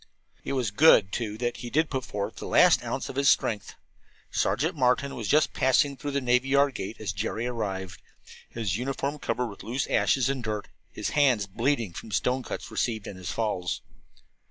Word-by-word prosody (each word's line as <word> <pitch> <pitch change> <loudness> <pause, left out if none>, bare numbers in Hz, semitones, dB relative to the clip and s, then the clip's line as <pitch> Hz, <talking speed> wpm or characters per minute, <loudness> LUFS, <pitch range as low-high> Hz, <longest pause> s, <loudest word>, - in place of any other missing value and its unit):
It - - -3
was 125 -6 0
good, 105 -6 +6
too, 110 -2 -3
that 120 +1 -2
he 120 - -6
did 155 +4 +1
put 130 -2 -2
forth 100 -3 -4
the - - -6
last - - +5
ounce - - -3
of - - -7
his 140 0 +4
strength. 105 -4 +1 0.6
Sergeant 165 +4 0
Martin 135 +1 +2
was 115 -4 -5
just 150 +5 +3
passing 140 +2 +3
through 145 +2 -5
the 140 0 0
navy 125 0 +2
yard 140 0 +4
gate 110 -1 -6
as 105 -3 -3
Jerry 115 +3 -3
arrived, 100 -7 -4 0.5
his 110 -5 -2
uniform 135 +3 -3
covered 125 - -1
with 105 -4 -8
loose 125 +4 -2
ashes 130 -3 +2
and 135 -2 -2
dirt, 105 -1 -3
and - - -28 0.2
his - - -3
hands 130 -9 +3
bleeding 115 0 -1
from 110 - -8
stone 125 +6 0
cuts - - -6
received 110 -4 -1
in - - -7
his 90 -3 -7
falls. 105 -6 -2
120 Hz, 195 wpm, -27 LUFS, 105-135 Hz, 0.6 s, good